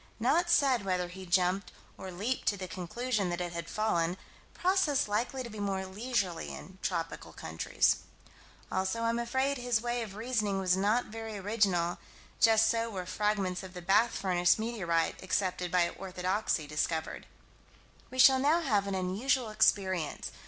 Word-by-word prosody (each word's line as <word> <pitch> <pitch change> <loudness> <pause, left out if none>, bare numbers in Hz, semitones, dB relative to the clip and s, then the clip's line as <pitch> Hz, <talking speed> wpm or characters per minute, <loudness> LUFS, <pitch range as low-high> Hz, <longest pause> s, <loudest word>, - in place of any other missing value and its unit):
Not 320 +10 +2
said 270 -9 +4
whether 180 -2 -1
he 185 +1 -9
jumped 180 +2 +1 0.2
or 190 - -8
leaped 210 +9 -3
to 205 - +2
the 185 -1 -5
conclusion 195 +4 -2
that 175 0 -2
it 175 -1 -3
had 170 -1 -5
fallen: 180 -5 0 0.4
process 350 - +2
likely 240 +5 -1
to 235 - -7
be 215 - -8
more 195 -2 -1
leisurely 195 -3 -2
in 190 0 -10
tropical 165 -3 -3
countries. 80 0 +1 0.7
Also 190 +5 -1
I'm 230 +1 +1
afraid 265 +3 0
his 245 -2 +1
way 240 +1 -2
of 210 -4 -6
reasoning 215 -3 -1
was 185 -1 +2
not 210 +6 +2
very 225 -1 -5
original: 195 -4 +1 0.4
just 225 0 +5
so 230 0 +1
were 190 -4 -5
fragments 195 -2 -1
of 185 -1 -10
the 180 - -6
Bath 210 +6 +3
furnace 180 -2 +3
meteorite, 195 -8 -1
accepted 185 -2 -1
by 175 -1 +3
orthodoxy, 185 -2 -2
discovered. 160 +2 -2 0.8
We 255 - -9
shall 260 0 +7
now 300 +5 +3
have 210 -10 +1
an 195 - -2
unusual 215 +6 0
experience. 190 -6 +1
200 Hz, 160 wpm, -31 LUFS, 180-235 Hz, 0.8 s, shall